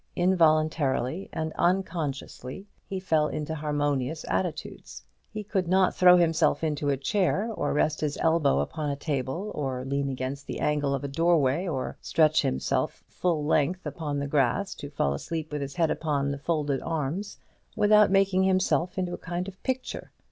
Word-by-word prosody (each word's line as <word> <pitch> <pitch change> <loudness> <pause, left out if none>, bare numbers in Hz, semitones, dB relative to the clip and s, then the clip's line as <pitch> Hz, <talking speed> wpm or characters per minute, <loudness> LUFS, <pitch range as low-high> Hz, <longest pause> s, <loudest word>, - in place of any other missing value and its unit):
Involuntarily 155 -3 +2
and 160 0 -3
unconsciously 170 -4 -2 0.2
he 190 - -3
fell 160 -5 +2
into 155 +1 -4
harmonious 145 -1 -1
attitudes. 95 -8 -4 0.3
He 215 - -6
could 195 -3 -1
not 185 +1 +3
throw 180 0 +7
himself 165 -1 +2
into 150 -2 0
a 140 - +1
chair, 200 - 0
or 145 -8 -1
rest 155 +1 +1
his 150 -2 -1
elbow 160 -4 +2
upon 155 -2 -3
a 140 - -1
table, 145 +7 -3
or 130 -3 -3
lean 140 +1 -1
against 135 +2 -4
the - - -4
angle 145 -2 +1
of 135 - -5
a - - -2
doorway, 165 +1 +2
or 135 -6 -3
stretch 155 0 +3
himself 65 0 -1
full 165 -5 -1
length 160 +4 +1
upon 150 -3 -3
the 140 - -2
grass 145 +7 +1
to 145 - -8
fall 70 - 0
asleep 155 - -4
with 150 -1 -3
his 140 0 -5
head 165 -3 +2
upon 140 -3 -1
his 140 0 -5
folded 145 -4 0
arms, 165 +5 -3 0.4
without 210 -1 +5
making 195 -1 +3
himself 185 -1 +1
into 180 -1 -1
a - - -5
kind 175 +1 -4
of 190 -1 -10
picture. 260 -1 -4
155 Hz, 170 wpm, -27 LUFS, 140-180 Hz, 0.4 s, throw